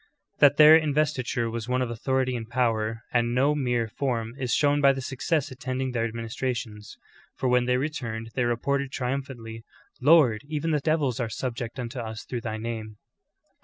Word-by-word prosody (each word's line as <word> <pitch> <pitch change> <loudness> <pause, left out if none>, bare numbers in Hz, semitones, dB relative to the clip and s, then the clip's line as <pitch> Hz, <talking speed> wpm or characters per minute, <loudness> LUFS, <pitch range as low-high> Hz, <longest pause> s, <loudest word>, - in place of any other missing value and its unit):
^ - - -39
That 145 -1 +6
their 155 +1 +9
mvestiture 140 -6 0
was 115 +1 -5
one 125 0 +1
of 120 - -4
authority 130 +2 0
and 115 -2 -6
power 115 -3 0
and 120 0 +1
no 140 +4 +3
mere 125 -5 0
form 115 -2 -2
is 125 -2 -2
shown 145 -1 +3
by 140 -1 +6
the 135 - -5
success 140 +2 -1
attending 130 0 -3
their 115 -2 0
administrations; 115 -1 -4 0.4
for 130 - -2
when 125 0 +3
they 125 0 +2
returned 120 -6 -4
they 125 - 0
reported 135 +3 -1
triumphantly, 125 -4 -4 0.4
"Lord, 135 -7 +5
even 155 +1 -2
the 150 - +2
devils 145 -5 0
are 120 -3 -1
subject 120 +1 -4
unto 125 +1 -5
us 110 -1 -6
through 120 -2 -4
thy 110 -1 -4
name." 110 -1 -5
125 Hz, 175 wpm, -26 LUFS, 115-140 Hz, 0.4 s, their